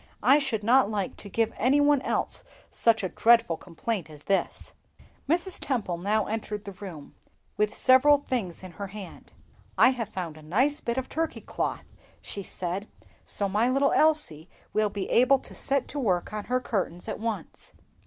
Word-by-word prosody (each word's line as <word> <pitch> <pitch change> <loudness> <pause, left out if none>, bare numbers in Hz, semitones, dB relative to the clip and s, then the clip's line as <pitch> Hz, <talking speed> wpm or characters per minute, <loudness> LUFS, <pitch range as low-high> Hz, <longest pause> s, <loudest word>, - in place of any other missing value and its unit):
"I 285 - +6
should 250 -7 -2
not 240 -1 +4
like 205 -3 -2
to 200 - -9
give 225 +2 0
any 260 +5 +3
one 290 -1 +4
else - - -1 0.3
such 225 -3 +2
a 185 - -1
dreadful 230 -2 +4
complaint 175 +1 -4
as 150 -1 -12
this." 195 -1 -1 0.6
Mrs. 350 +3 0
Temple 205 -10 -1
now 210 +3 +1
entered 210 -1 -4
the 200 - -6
room, 185 -7 -10 0.4
with 210 0 +1
several 260 +5 +5
things 230 -11 -4
in 185 - -8
her 200 +4 -6
hand. 195 -2 -10 0.5
"I - - +7
have 240 -5 -3
found 170 -6 -5
a - - -12
nice 255 - +1
bit 235 +1 -2
of 260 - -1
red - - -23
Turkey 325 +1 -2
cloth," - - -3 0.4
said 190 0 -5
she, - - -30 0.2
"so 200 - 0
my 210 +5 +2
little 275 +2 +3
Elsie 300 - +2 0.2
will 215 -1 +2
be 200 -1 -4
able 255 +3 +5
to - - -8
set 275 -1 0
to 290 - -4
work 185 -7 0
on 210 -1 -4
her 255 +1 +1
curtains 190 -7 -3
at - - -4
once." 215 -6 -5
215 Hz, 185 wpm, -27 LUFS, 190-260 Hz, 0.6 s, I